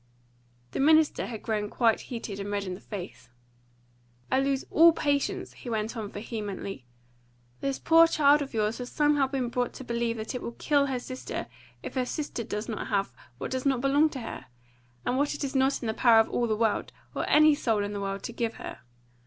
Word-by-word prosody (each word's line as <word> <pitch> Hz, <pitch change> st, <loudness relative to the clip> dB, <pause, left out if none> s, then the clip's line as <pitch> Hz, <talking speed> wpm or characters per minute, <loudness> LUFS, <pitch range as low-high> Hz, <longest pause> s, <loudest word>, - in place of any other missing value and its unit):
The -, -, -4 dB
minister 310 Hz, +2 st, +4 dB
had 225 Hz, -3 st, -7 dB
grown 210 Hz, -2 st, -1 dB
quite 230 Hz, -1 st, +2 dB
heated 225 Hz, -5 st, -5 dB
and 200 Hz, 0 st, -4 dB
red 205 Hz, -1 st, -1 dB
in 185 Hz, -2 st, -4 dB
the 180 Hz, -, -8 dB
face. 180 Hz, -, -8 dB, 1.0 s
"I 260 Hz, -, +4 dB
lose 275 Hz, 0 st, 0 dB
all 335 Hz, +1 st, +7 dB
patience!" 285 Hz, -3 st, -1 dB
he 245 Hz, -, -9 dB
went 220 Hz, +1 st, -2 dB
on 215 Hz, -3 st, -4 dB
vehemently. 205 Hz, -, -5 dB, 0.7 s
"This 275 Hz, -1 st, -1 dB
poor 330 Hz, 0 st, +6 dB
child 295 Hz, -2 st, +4 dB
of 280 Hz, -, -4 dB
yours 215 Hz, 0 st, -1 dB
has 250 Hz, 0 st, -5 dB
somehow 295 Hz, -2 st, +3 dB
been 260 Hz, -3 st, -2 dB
brought 245 Hz, 0 st, -1 dB
to -, -, -8 dB
believe 235 Hz, -1 st, -1 dB
that 220 Hz, +3 st, -5 dB
it 250 Hz, -, -4 dB
will 235 Hz, -, -5 dB
kill 285 Hz, +1 st, +2 dB
her 265 Hz, -2 st, -1 dB
sister 255 Hz, +1 st, -5 dB, 0.4 s
if -, -, -6 dB
her 255 Hz, -2 st, 0 dB
sister 285 Hz, -5 st, -3 dB
does 210 Hz, 0 st, -4 dB
not 220 Hz, -, -4 dB
have 195 Hz, -, 0 dB, 0.2 s
what -, -, -5 dB
does 260 Hz, 0 st, -2 dB
not 270 Hz, -3 st, +2 dB
belong 280 Hz, +4 st, +3 dB
to 265 Hz, -4 st, -6 dB
her, 225 Hz, -, -7 dB, 0.6 s
and 250 Hz, -, +1 dB
what 290 Hz, +1 st, +1 dB
it 290 Hz, -, -5 dB
is 275 Hz, -, -3 dB
not 270 Hz, 0 st, +2 dB
in -, -, -3 dB
the 220 Hz, -, 0 dB
power 230 Hz, -1 st, +6 dB
of 225 Hz, -, +3 dB
all 240 Hz, -, +1 dB
the 215 Hz, -, +1 dB
world, 225 Hz, -1 st, 0 dB, 0.2 s
or -, -, -2 dB
any 305 Hz, 0 st, +7 dB
soul 225 Hz, -7 st, 0 dB
in 205 Hz, 0 st, -4 dB
the 200 Hz, -, -4 dB
world, 195 Hz, 0 st, -3 dB
to 235 Hz, -, -5 dB
give 230 Hz, -1 st, -2 dB
her. -, -, -8 dB
240 Hz, 215 wpm, -28 LUFS, 215-275 Hz, 1.0 s, all